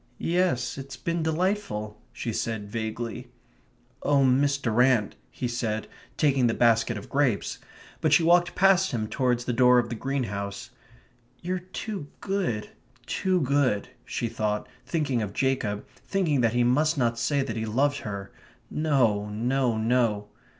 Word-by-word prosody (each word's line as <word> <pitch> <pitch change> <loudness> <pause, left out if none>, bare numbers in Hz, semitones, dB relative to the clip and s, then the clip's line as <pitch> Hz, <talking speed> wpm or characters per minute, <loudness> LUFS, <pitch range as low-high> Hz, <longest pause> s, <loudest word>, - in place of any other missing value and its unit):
"Yes, 175 -7 0
it's 135 -1 -8
been 170 0 -2
delightful," 160 - -1
she 115 - -4
said 110 -2 -3
vaguely. 115 +2 -4 0.7
"Oh, 140 -1 +3
Miss 140 +2 +3
Durrant," 120 -3 +2
he 125 - -4
said, 115 -3 -2 0.3
taking 135 -5 +3
the 115 - 0
basket 115 -1 +3
of 100 - -8
grapes; 135 -7 0 0.4
but - - +2
she 170 - +5
walked 175 +1 +4
past 190 -2 +4
him 110 -3 -1
towards 125 0 0
the 125 - -1
door 125 +1 +5
of 120 -1 +2
the - - -3
greenhouse. 105 -6 -3 0.7
"You're 180 +1 -2
too 185 -2 -6
good 190 - -2 0.3
too 185 +6 0
good," 130 -7 +1
she 120 - -3
thought, 110 -2 -2 0.2
thinking 145 -8 0
of 100 -2 -4
Jacob, 120 -6 -1 0.2
thinking 165 -9 +1
that 115 -1 +2
he 120 0 +3
must 150 +6 +2
not 115 -3 +1
say 140 +4 +1
that 110 - -4
he 110 -1 -3
loved 140 +6 +1
her. 100 -2 -6 0.4
No, 120 -10 +1
no, 120 +2 0
no. 110 -2 +1
125 Hz, 150 wpm, -26 LUFS, 110-145 Hz, 0.7 s, she